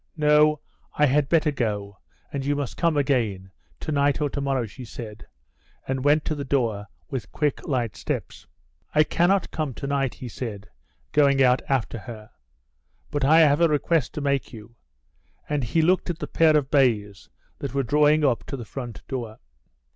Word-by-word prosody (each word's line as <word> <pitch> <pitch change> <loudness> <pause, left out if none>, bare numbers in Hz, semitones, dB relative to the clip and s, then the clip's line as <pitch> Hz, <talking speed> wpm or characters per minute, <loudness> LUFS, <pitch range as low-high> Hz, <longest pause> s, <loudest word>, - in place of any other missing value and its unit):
"No, 150 0 +4 0.4
I 150 - +5
had 145 +1 +2
better 160 -2 +3
go, 105 -7 -3 0.3
and 140 -1 -2
you 145 +1 0
must 140 -4 -4
come 165 -3 +1
again, 115 -10 0 0.3
to 155 - -4
night 140 -1 +2
or 145 -2 -1
to 140 - -3
morrow," 135 -3 0
she 110 +4 -10
said, 115 -3 -9 0.6
and 130 -1 -2
went 145 +1 +3
to - - -1
the 145 -2 -4
door 115 -7 -1 0.2
with 120 -6 -5
quick, 150 -3 -1
light 120 -7 -1
steps. - - -5 0.5
"I 155 - +6
cannot 175 +5 +1
come 150 -6 -3
to - - -6
night," 140 -2 -1
he 130 - -8
said, 110 -3 -6 0.4
going 140 -2 +4
out 125 0 +4
after 125 -3 0
her; 110 -2 -10 0.8
"but 145 -1 -1
I 160 +4 +6
have 150 0 +4
a 170 - +6
request 150 -1 0
to 150 - -3
make 140 -1 -1
you," 115 0 -12 0.7
and 145 -2 -1
he 155 +8 +1
looked 180 +2 +2
at 175 - -2
the - - -4
pair 160 -2 +4
of 140 -3 -2
bays 110 -8 +1 0.3
that 140 -2 -5
were 135 - +1
drawing 150 +4 +3
up 120 -5 +1
to 140 - -5
the 120 - -7
front 120 0 -8
door. 120 -5 -5
140 Hz, 185 wpm, -24 LUFS, 120-150 Hz, 0.8 s, I